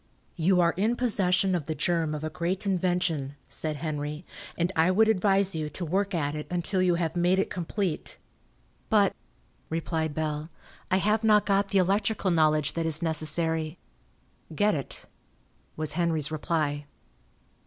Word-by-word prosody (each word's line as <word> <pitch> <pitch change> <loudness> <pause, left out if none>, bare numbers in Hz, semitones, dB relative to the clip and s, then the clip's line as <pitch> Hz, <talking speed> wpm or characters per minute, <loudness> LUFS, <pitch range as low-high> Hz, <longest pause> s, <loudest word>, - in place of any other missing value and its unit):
"You 180 +2 +3
are 170 -1 +3
in 220 +5 +2
possession 195 -6 +1
of 170 -5 -2
the 160 - -2
germ 165 0 0
of 150 - -6
a 155 - -3
great 180 +4 -2
invention," 175 -7 0
said 155 -1 -4
Henry, 150 +1 -4 0.3
"and 175 +2 +1
I 165 +2 +4
would 215 +4 +4
advise 195 -2 +2
you 155 -2 -3
to 175 - -4
work 195 +4 0
at 145 -3 -1
it 150 0 -5
until 180 +2 0
you 180 -1 +3
have 170 -1 -1
made 175 +2 +3
it 195 - 0
complete." 180 -1 -3 0.7
"But," 205 -3 +4 0.5
replied 160 -2 -2
Bell, 155 0 -2 0.4
"I 185 - +3
have 210 +3 +1
not 210 -1 +5
got 200 0 +2
the 200 - +1
electrical 195 +1 +1
knowledge 155 -3 +3
that 165 -1 -1
is 160 0 0
necessary." 160 0 +1 0.8
"Get 210 +5 +3
it," 140 -4 -3 0.7
was 155 -1 -2
Henry's 160 -3 0
reply. 150 -2 -1
170 Hz, 155 wpm, -27 LUFS, 155-190 Hz, 0.8 s, not